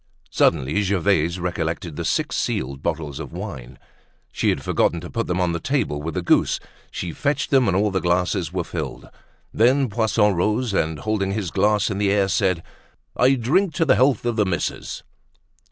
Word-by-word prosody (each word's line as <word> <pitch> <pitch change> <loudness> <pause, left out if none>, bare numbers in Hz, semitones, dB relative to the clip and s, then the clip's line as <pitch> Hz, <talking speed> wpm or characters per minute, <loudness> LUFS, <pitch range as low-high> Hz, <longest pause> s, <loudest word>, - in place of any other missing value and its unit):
Suddenly 75 +4 +2
Gervaise 95 -3 +1
recollected 85 -1 -3
the - - -4
six - - 0
sealed 70 +1 -2
bottles 75 -3 -3
of - - -7
wine. 65 - -7 0.5
She - - 0
had - - -1
forgotten 85 - +1
to 90 - -9
put 115 - -2
them 90 +1 -1
on 90 -1 +1
the 85 - -2
table 125 - -1
with 80 +1 -5
the - - -2
goose; - - +2 0.3
she 85 - -5
fetched 145 - -1
them, 135 -4 +4
and 95 -1 +2
all 105 +1 +2
the 95 -1 -1
glasses 90 -1 0
were - - -2
filled. - - -6 0.5
Then 130 +3 +3
Poisson 110 -2 +2
rose, 105 +6 0
and 80 -4 0
holding 100 +2 -1
his 100 -5 -3
glass 105 +1 +2
in 100 - -3
the 100 -1 +2
air, 100 -1 +2
said: 95 -4 +1 0.5
"I 130 +2 +4
drink 160 - +1
to 165 - +2
the - - +5
health 125 +2 +2
of 120 -1 -1
the 105 - +3
missus." 85 -4 -3
95 Hz, 185 wpm, -22 LUFS, 85-110 Hz, 0.5 s, the